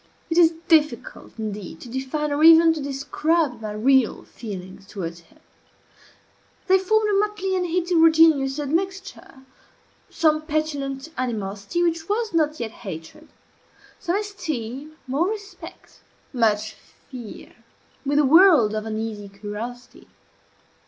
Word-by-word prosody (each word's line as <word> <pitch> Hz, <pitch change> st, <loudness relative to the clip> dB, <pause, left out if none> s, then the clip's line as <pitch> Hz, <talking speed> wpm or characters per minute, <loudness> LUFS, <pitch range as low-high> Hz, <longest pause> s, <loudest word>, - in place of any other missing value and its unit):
It 330 Hz, -, 0 dB
is 330 Hz, -1 st, +5 dB
difficult, 320 Hz, +10 st, +1 dB
indeed, 210 Hz, -6 st, -6 dB
to -, -, -10 dB
define, 265 Hz, +4 st, -3 dB
or 290 Hz, +2 st, 0 dB
even 325 Hz, 0 st, +8 dB
to 315 Hz, -, -5 dB
describe, 280 Hz, 0 st, -1 dB
my 215 Hz, -1 st, -5 dB
real 255 Hz, +2 st, +2 dB
feelings 195 Hz, -3 st, -9 dB
towards 170 Hz, -4 st, -6 dB
him. 170 Hz, -, -24 dB, 1.3 s
They 380 Hz, 0 st, +4 dB
formed 435 Hz, +3 st, +2 dB
a 395 Hz, -, +3 dB
motley 410 Hz, -2 st, -1 dB
and 360 Hz, -1 st, 0 dB
heterogeneous 325 Hz, -5 st, +4 dB
admixture: 345 Hz, -1 st, -4 dB, 0.7 s
some 310 Hz, -2 st, +2 dB
petulant 300 Hz, -2 st, -3 dB
animosity, 210 Hz, -, -2 dB
which 335 Hz, 0 st, -1 dB
was 430 Hz, -1 st, -1 dB
not 310 Hz, -2 st, +1 dB
yet 230 Hz, -2 st, -4 dB
hatred, 190 Hz, -, -9 dB, 0.7 s
some 350 Hz, 0 st, -1 dB
esteem, 310 Hz, -, -5 dB
more 280 Hz, +7 st, 0 dB
respect, 415 Hz, -2 st, -9 dB, 0.3 s
much 215 Hz, -3 st, +1 dB, 0.4 s
fear, 240 Hz, -5 st, -10 dB, 0.5 s
with 285 Hz, +1 st, 0 dB
a 295 Hz, -, +4 dB
world 310 Hz, -, +6 dB
of 215 Hz, 0 st, -3 dB
uneasy 215 Hz, -2 st, -5 dB
curiosity. 210 Hz, +5 st, -8 dB
290 Hz, 120 wpm, -23 LUFS, 225-335 Hz, 1.3 s, even